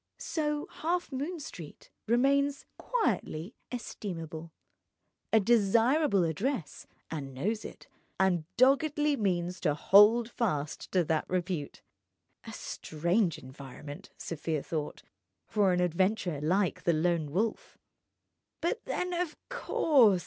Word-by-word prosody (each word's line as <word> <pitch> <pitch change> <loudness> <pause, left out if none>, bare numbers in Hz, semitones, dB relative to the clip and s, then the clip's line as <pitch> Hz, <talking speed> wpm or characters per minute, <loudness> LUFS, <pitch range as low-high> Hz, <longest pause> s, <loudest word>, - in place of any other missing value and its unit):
So 300 -2 -2 0.2
Halfmoon 330 -1 -2
Street 170 - -10 0.2
remains 275 +4 +2
quietly 230 - -1 0.2
estimable, 165 -9 -6 0.8
a 220 - +6
desirable 230 - +3
address, 170 - -2 0.2
and 140 -4 -5
knows 210 - -1
it, - - -10 0.3
and 180 -4 +2
doggedly 290 +3 +4
means 180 -5 -1
to 150 -4 +1
hold 210 +7 +6
fast 150 - -2
to 180 -2 +4
that 160 -1 -1
repute. 180 -5 -3 0.6
A - - -6
strange 170 +3 -1
environment 140 +2 -10
(Sofia 160 -2 -3
thought) 155 -3 -4 0.4
for 205 -4 +2
an 180 - +1
adventurer 180 -2 +1
like 185 +4 +1
the 170 - +2
Lone 160 -1 +1
Wolf. 210 +8 -2 0.8
But 340 - -1
then—of 360 -2 -2
course! 270 - +4
195 Hz, 105 wpm, -30 LUFS, 165-265 Hz, 0.8 s, a